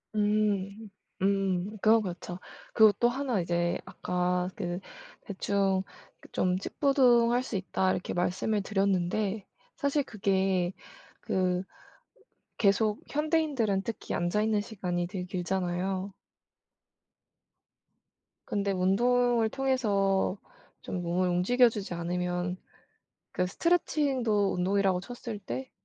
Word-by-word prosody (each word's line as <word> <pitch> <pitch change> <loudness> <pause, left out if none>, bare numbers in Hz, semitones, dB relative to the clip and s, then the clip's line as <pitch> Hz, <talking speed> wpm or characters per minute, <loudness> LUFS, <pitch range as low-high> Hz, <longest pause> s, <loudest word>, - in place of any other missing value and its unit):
음. 210 0 0 0.3
음. 195 +1 0
그건 220 +1 +5
그렇죠. 180 0 -6 0.3
그리고 220 -2 +7
또 240 - +4
하나 250 -6 -1
이제 175 0 0
아까 180 0 -1
그 175 -4 -3 0.4
대충 195 -1 0 0.4
그 - - -16
좀 180 0 +1
"찌뿌둥할 245 0 +3
수 235 - -5
있다." 190 0 0
이렇게 180 - -3
말씀을 185 +4 0
드렸는데 195 +1 0 0.3
사실 285 -1 +1
그게 190 -4 0 0.5
그 185 0 0 1.0
계속 210 +1 +2
현대인들은 295 - +1
특히 230 0 -5
앉아 175 +5 0
있는 215 -1 +2
시간이 180 -5 -3
되게 180 -1 -5
길잖아요. 185 +1 -2 2.4
근데 200 -1 0
운동을 235 +5 +2
통해서 205 -8 +1 0.4
좀 180 -2 -4
몸을 180 +2 +1
움직여 240 +8 +4
주지 205 -5 -5
않으면 180 +1 -2 0.8
그 180 0 0
스트레칭도 265 - +1
운동이라고 190 0 +1
쳤을 235 -1 -7
때 260 +6 -6
195 Hz, 230 characters per minute, -29 LUFS, 180-225 Hz, 2.4 s, 그리고